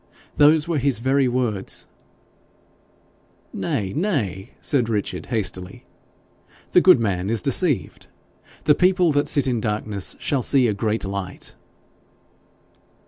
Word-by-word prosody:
Those 150 +1 +5
were 165 -4 0
his 135 -2 +1
very 135 +3 +1
words.' 120 -6 -2 1.7
'Nay, 95 -2 -2
nay!' 120 - -2
said 125 -6 0
Richard, 105 -3 -3
hastily; 95 -5 -4 0.9
'the 180 - +5
good 185 -8 +6
man 95 -4 -1
is 115 0 0
deceived; 140 - 0 0.6
the 150 - +5
people 180 0 +3
that 145 0 +1
sit 140 -2 +2
in 125 -4 -1
darkness 105 -2 -2
shall 140 -3 -1
see 130 0 +3
a 105 - 0
great 110 +1 -2
light.' 95 -1 -6
120 Hz, 120 wpm, -22 LUFS, 100-145 Hz, 1.7 s, good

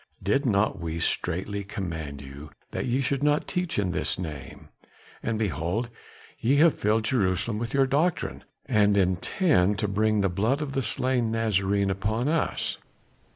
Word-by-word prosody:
Did 125 +9 +1
not 105 -1 +1
we 80 -1 -4
straightly 100 +5 -1
command 80 -8 -5
you 70 +2 -10 0.2
that - - -3
ye 125 +3 +1
should 135 +1 -1
not 150 +1 +2
teach 180 -2 -2
in 100 -3 +1
this - - -1
name? 75 -7 -7 0.5
And, 115 -1 -1
behold, 105 - -1 0.5
ye 130 +5 +2
have 155 +1 +6
filled 110 +2 +2
Jerusalem 105 -2 0
with 115 +3 -3
your 135 -1 +4
doctrine, 150 +6 0 0.2
and 105 -1 +3
intend 95 - +2
to 105 - 0
bring 105 +1 +1
the 100 - +3
blood 110 - 0
of 150 -2 -3
the 135 - 0
slain 125 0 0
Nazarene 100 -3 +1
upon 110 +6 -1
us." 160 -1 -1
105 Hz, 155 wpm, -26 LUFS, 95-130 Hz, 0.5 s, have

